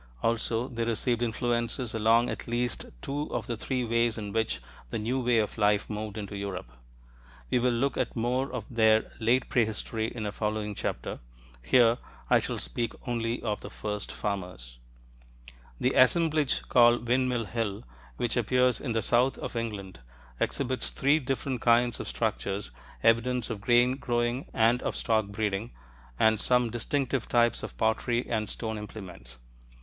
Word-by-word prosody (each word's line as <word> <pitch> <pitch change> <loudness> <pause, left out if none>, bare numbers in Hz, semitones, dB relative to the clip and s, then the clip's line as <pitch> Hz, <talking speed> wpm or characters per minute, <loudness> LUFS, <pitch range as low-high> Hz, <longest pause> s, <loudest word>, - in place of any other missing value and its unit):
Also, 115 +1 0
they 115 -3 -3
received 115 +1 0
influences 120 +1 -1
along 115 +2 +4
at - - -4
least 120 +1 -1 0.2
two 145 +2 -3
of 120 -3 -2
the 120 - -3
three 125 +3 -2
ways 115 0 +1
in 105 -2 -5
which 110 - 0 0.3
the - - -2
new 115 +5 -1
way 120 -2 +2
of 110 0 0
life 105 0 +3
moved 105 0 -4
into 100 -1 -5
Europe. 95 -10 -5 0.8
We - - +3
will 125 +1 +2
look 125 +3 0
at - - -1
more 125 +4 0
of 125 -5 -4
their 110 -2 +3
late 120 +3 +2
prehistory 110 -1 0
in 115 -2 -5
a 105 - -2
following 105 0 -2
chapter: - - -4 0.4
here, 120 - +4 0.3
I - - +7
shall - - -3
speak 85 - -3
only 115 -1 -1
of 105 -2 -2
the - - -7
first 105 -1 -4
farmers. 90 - -5 1.0
The 130 - +2
assemblage 155 +1 +3
called 120 -1 +5
Windmill 125 -1 +1
Hill, 105 -2 -3 0.3
which 120 -2 -1
appears 125 +1 +2
in 120 -5 -2
the 115 - 0
south 125 +3 +3
of - - -6
England, 105 - -4 0.4
exhibits 130 -2 0
three 140 +3 +3
different 135 -1 -2
kinds 120 0 +3
of - - -5
structures, 95 +7 -2 0.3
evidence 115 +1 +2
of 105 -3 -5
grain 120 +3 +4
growing 120 0 -1
and 115 +2 +3
of - - -2
stock 110 -3 +1
breeding, 105 +1 -2 0.5
and 110 - +4
some 125 -2 +2
distinctive 130 +2 -1
types 120 -1 +3
of - - -7
pottery 115 +2 +1
and 110 -2 -1
stone 110 -2 -4
implements. 90 - -9
115 Hz, 160 wpm, -28 LUFS, 110-125 Hz, 1.0 s, I